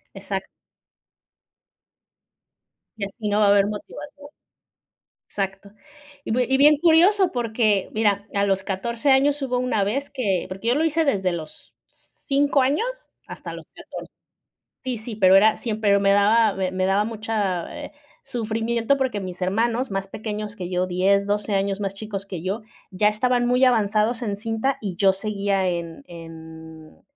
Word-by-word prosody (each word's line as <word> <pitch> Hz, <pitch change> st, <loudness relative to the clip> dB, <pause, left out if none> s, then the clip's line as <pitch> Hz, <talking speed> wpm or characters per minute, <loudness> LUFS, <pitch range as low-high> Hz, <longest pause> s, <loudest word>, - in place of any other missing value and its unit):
Exacto. -, -, -5 dB, 2.5 s
Y 200 Hz, -, -2 dB
así 210 Hz, +2 st, -6 dB
no 205 Hz, +1 st, +1 dB
va 210 Hz, -, +4 dB
a -, -, +5 dB
haber 200 Hz, 0 st, +4 dB
motivación. 285 Hz, +7 st, -8 dB, 1.0 s
Exacto. 195 Hz, 0 st, -4 dB, 0.5 s
Y -, -, -4 dB
bie 250 Hz, +2 st, +2 dB
y 265 Hz, -, +3 dB
bien 295 Hz, +2 st, +6 dB
curioso 350 Hz, +5 st, +4 dB
porque 220 Hz, -4 st, 0 dB
mira, 205 Hz, -2 st, +1 dB
a 200 Hz, -1 st, +1 dB
los 195 Hz, -1 st, 0 dB
14 235 Hz, +7 st, -2 dB
años 280 Hz, +2 st, +3 dB
hubo 255 Hz, -2 st, -1 dB
una 250 Hz, -5 st, 0 dB
vez 265 Hz, +8 st, -2 dB
que 205 Hz, -10 st, -1 dB
porque 190 Hz, +4 st, -7 dB
yo 245 Hz, -, +3 dB
lo 310 Hz, +3 st, +2 dB
hice 325 Hz, +1 st, +1 dB
desde 195 Hz, -, +1 dB
los 160 Hz, -3 st, -8 dB
5 280 Hz, 0 st, -1 dB
años 285 Hz, -, +1 dB, 0.4 s
hasta -, -, -8 dB
los -, -, -9 dB
14 -, -, -10 dB, 0.7 s
sí, 255 Hz, -2 st, -3 dB
sí, 220 Hz, +1 st, -7 dB
pero 190 Hz, -2 st, +5 dB
era 215 Hz, +2 st, +5 dB
siempre, 215 Hz, -3 st, +1 dB
me 195 Hz, 0 st, +3 dB
daba 215 Hz, +2 st, +4 dB
m 190 Hz, -1 st, -2 dB
me 185 Hz, 0 st, -1 dB
daba 195 Hz, +2 st, +2 dB
mucha, 215 Hz, -5 st, -3 dB
eh, -, -, -11 dB, 0.3 s
sufrimiento 230 Hz, +1 st, -1 dB
porque 260 Hz, -6 st, -1 dB
mis 185 Hz, -1 st, -7 dB
hermanos 230 Hz, +7 st, 0 dB
más 195 Hz, 0 st, -3 dB
pequeños 210 Hz, 0 st, -5 dB
que 180 Hz, -2 st, -5 dB
yo, 180 Hz, 0 st, 0 dB
10, 195 Hz, +2 st, +2 dB
12 205 Hz, 0 st, -1 dB
años 195 Hz, 0 st, 0 dB
más 195 Hz, -1 st, -3 dB
chicos 200 Hz, -1 st, -6 dB
que 185 Hz, -4 st, -6 dB
yo, 195 Hz, +6 st, -3 dB, 0.3 s
ya 195 Hz, +3 st, +2 dB
estaban 245 Hz, +3 st, +1 dB
muy 250 Hz, +2 st, +2 dB
avanzados 220 Hz, 0 st, +2 dB
en 210 Hz, -4 st, -2 dB
cinta 225 Hz, +6 st, -2 dB
y 195 Hz, -4 st, -4 dB
yo 195 Hz, 0 st, +4 dB
seguía 200 Hz, -1 st, -1 dB
en 170 Hz, -2 st, -5 dB
en 160 Hz, -2 st, -12 dB
210 Hz, 160 wpm, -23 LUFS, 195-240 Hz, 2.5 s, bien